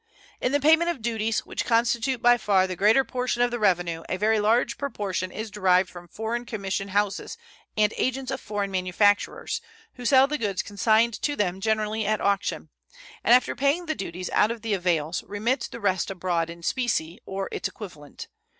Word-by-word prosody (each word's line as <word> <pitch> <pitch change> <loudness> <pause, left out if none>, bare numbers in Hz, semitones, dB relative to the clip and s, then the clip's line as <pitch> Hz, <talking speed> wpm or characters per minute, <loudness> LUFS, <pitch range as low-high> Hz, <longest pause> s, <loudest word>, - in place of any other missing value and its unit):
In 250 - +1
the 285 - +2
payment 320 +4 +4
of 275 -10 -4
duties, 225 -1 -1
which - - -3
constitute 235 +2 +1
by 240 0 +7
far 195 -4 +3
the 185 -1 -4
greater 215 +8 +4
portion 250 -1 -1
of 245 - +1
the 240 - -3
revenue, 175 -5 +1
a 185 - -1
very 215 +2 +2
large 235 +3 +2
proportion 200 -9 -3
is 220 +2 -6
derived 185 -3 +2
from 175 -1 -11
foreign 225 +6 -3
commission 200 -3 -3
houses 200 0 -1 0.4
and 210 0 +3
agents 260 +1 -1
of 265 - -4
foreign 205 -2 -3
manufacturers, 190 - +1 0.3
who 245 - -10
sell 265 +2 +6
the 300 +1 -3
goods 200 -4 -1
consigned 220 +2 +2
to 290 - 0
them 190 -5 -1
generally 220 0 0
at 215 +1 0
auction, 200 -1 -1 0.5
and 240 - +7
after 255 - +1
paying 285 +6 +1
the 315 - -1
duties 180 - -5
out 210 - +3
of 230 -1 -5
the 225 -2 -1
avails 170 -3 0
remit 230 +5 -1
the - - -8
rest 190 -2 0
abroad 175 -3 -1
in 170 0 -10
specie 190 -7 -1
or 195 0 -3
its - - -2
equivalent. 155 -9 -10
210 Hz, 185 wpm, -25 LUFS, 190-240 Hz, 0.5 s, by